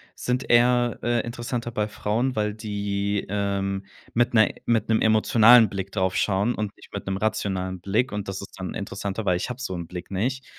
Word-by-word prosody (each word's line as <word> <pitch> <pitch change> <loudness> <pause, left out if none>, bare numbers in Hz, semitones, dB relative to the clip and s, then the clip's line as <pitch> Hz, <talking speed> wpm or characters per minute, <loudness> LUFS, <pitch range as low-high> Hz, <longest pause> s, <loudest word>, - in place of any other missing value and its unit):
sind 125 +1 -2
eher, 120 0 +4
äh, 120 -1 +1
interessanter 120 0 -4
bei 105 -1 -1
Frauen, 115 +5 -1
weil 105 -1 0
die, 100 -2 -2
ähm, 100 -1 -1 0.3
mit 120 +1 +2
'ner 110 -2 +5 0.2
mit 115 -2 +1
'nem 110 - +3
emotionalen 110 +1 +6
Blick 95 0 -5
drauf 95 -2 0
schauen 100 +4 +1
und 105 -2 -4
nicht - - -17
mit - - -5
'nem 95 - -1
rationalen 95 -3 -2
Blick. 105 +8 0
Und 105 -1 -4
das 95 0 -4
ist 100 - -10
dann 95 - -4
interessanter, 100 +1 -4
weil 90 -3 +2
ich 90 - -4
hab 125 +1 -6
so 95 - -3
'n 85 -1 -5
Blick 90 0 -8
nicht. 125 +7 -2
105 Hz, 200 wpm, -25 LUFS, 95-120 Hz, 0.3 s, emotionalen